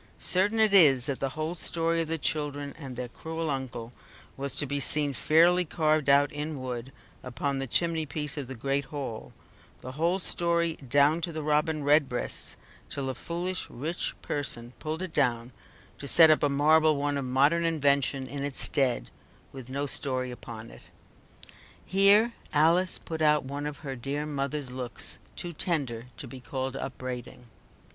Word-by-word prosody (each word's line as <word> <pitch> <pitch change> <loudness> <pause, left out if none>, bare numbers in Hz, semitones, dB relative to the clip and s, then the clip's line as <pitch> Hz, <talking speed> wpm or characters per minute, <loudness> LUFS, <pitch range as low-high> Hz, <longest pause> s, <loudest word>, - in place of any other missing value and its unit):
Certain 205 +5 +1
it 215 -2 +4
is 140 -10 +8
that 140 -2 -3
the 135 - -1
whole 155 +2 -2
story 165 -1 -1
of 165 - -3
the 165 +1 -1
children 145 -2 -3
and 135 -5 -8
their 125 0 -4
cruel 160 +4 -5
uncle 125 -3 -5 0.4
was 140 0 -4
to 145 - 0
be 145 +1 -2
seen 145 0 +4
fairly 165 +10 +4
carved 155 -3 +1
out 140 +1 +5
in 150 0 -5
wood 125 0 -5 0.3
upon 135 +2 -3
the 135 - -3
chimney 165 +3 0
piece 150 0 -3
of 145 -4 -4
the 135 - -6
great 135 +3 -1
hall, 135 -6 -6 0.5
the 130 - -7
whole 165 +7 0
story 170 -2 0
down 145 +5 +2
to 170 - -3
the 155 -1 -5
Robin 150 0 +1
Redbreasts, 145 -3 0 0.3
till 135 -2 -4
a - - -6
foolish 175 +6 -3
rich 155 +8 -3
person 120 -4 -4
pulled 155 +3 -4
it 185 - -7
down 120 -4 0 0.5
to 140 - -6
set 160 +2 +7
up 155 - +3
a 145 - +2
marble 155 +2 +4
one 145 0 -1
of 140 - -2
modern 140 +6 +2
invention 140 -4 +1
in 140 +1 -5
its 140 -1 -3
stead, 125 - 0 0.4
with 130 -2 -10
no 140 +2 -2
story 130 -2 -2
upon 115 -2 -9
it. - - -14 1.0
Here 200 +5 +6 0.2
Alice 170 +4 +3
put 160 -1 -6
out 150 -2 +3
one 140 +2 -4
of 150 -1 -6
her 135 -1 -4
dear 140 +4 -4
mother's 140 -2 -3
looks, 125 -2 -6 0.2
too 175 -1 -6
tender 135 -9 -2
to - - -8
be 130 - -9
called 130 +2 -4
upbraiding. 125 -2 -7
145 Hz, 170 wpm, -28 LUFS, 130-160 Hz, 1.0 s, is